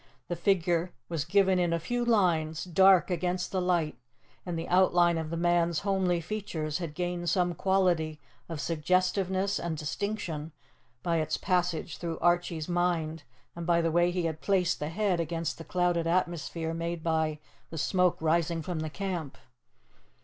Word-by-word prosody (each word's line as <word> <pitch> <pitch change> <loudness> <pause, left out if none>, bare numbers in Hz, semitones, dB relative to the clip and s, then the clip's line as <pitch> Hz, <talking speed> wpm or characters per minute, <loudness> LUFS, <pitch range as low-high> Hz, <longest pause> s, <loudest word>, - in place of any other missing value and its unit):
The 175 - -1
figure 175 -1 +1 0.2
was 160 -3 -2
given 190 +1 +3
in 175 -1 +1
a 170 - +1
few 245 +8 -2
lines, 170 -9 +2
dark 190 +1 +5
against 180 0 -1
the 190 -2 0
light, 175 -4 0 0.5
and 175 -2 -2
the 165 - -4
outline 175 -2 +4
of 160 -1 -4
the 170 - -3
man's 170 -1 +2
homely 190 -3 +1
features 170 -5 -3
had 165 -4 -5
gained 175 0 -2
some 180 -1 +1
quality 175 -4 +1 0.3
of 165 -2 -4
suggestiveness 185 +4 +1
and 165 -2 -3
distinction 160 -1 -4 0.5
by 170 -1 +1
its 155 -1 0
passage 180 -4 -1
through 165 -2 -4
Archie's 175 -2 +1
mind, 175 -3 0 0.3
and 170 0 -6
by 170 -1 +4
the 165 -1 +1
way 175 +2 +3
he 175 0 -1
had 160 -1 -3
placed 185 -3 +1
the 150 - -3
head 190 0 0
against 165 -1 -2
the - - -6
clouded 175 -1 0
atmosphere 170 -2 -1
made 165 0 -3
by 160 -2 0 0.3
the 165 - -7
smoke 180 +3 +2
rising 165 0 +1
from 175 -1 -3
the 155 0 -3
camp. 175 -5 -4
175 Hz, 165 wpm, -29 LUFS, 165-180 Hz, 0.5 s, dark